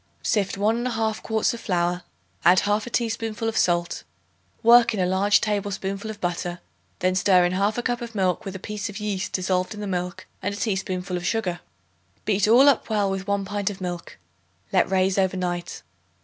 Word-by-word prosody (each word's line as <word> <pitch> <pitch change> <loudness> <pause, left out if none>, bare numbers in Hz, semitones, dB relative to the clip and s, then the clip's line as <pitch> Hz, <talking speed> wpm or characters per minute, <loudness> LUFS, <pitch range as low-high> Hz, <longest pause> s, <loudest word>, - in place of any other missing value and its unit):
Sift 200 -2 0
1 220 +4 +1
1/2 225 -3 -1
quarts 220 0 0
of 235 - -6
flour; 175 -2 0 0.4
add 180 +2 +6
1/2 210 +3 0
teaspoonful 225 -1 -1
of 225 - -2
salt; 175 -1 +1 0.6
work 235 0 +6
in - - -3
a 180 - +2
large 190 +3 +3
tablespoonful 200 0 -2
of 215 -1 -7
butter; 175 -1 -3 0.4
then 185 0 +2
stir 185 -1 +4
in 175 - 0
1/2 205 +5 0
cup 245 -1 0
of 230 -2 -7
milk 185 0 +1
with 195 -2 -6
a - - -3
piece 210 +3 -5
of 200 - -7
yeast 210 -2 -2
dissolved 185 +2 0
in - - -8
the 210 - -4
milk 180 -2 -3 0.2
and 200 - -2
a - - -7
teaspoonful 190 -3 -2
of 175 - -6
sugar. 185 -6 -1 0.7
Beat 205 -1 +2
all 245 +6 +7
up 280 -5 +3
well 205 -3 +1
with 195 +1 -4
1 200 -1 0
pint 205 0 -1
of 200 - -7
milk; 175 -2 -6 0.6
let 185 -2 +3
raise 190 0 +2
over 190 0 +1
night. 175 -1 -3
195 Hz, 190 wpm, -24 LUFS, 185-215 Hz, 0.7 s, all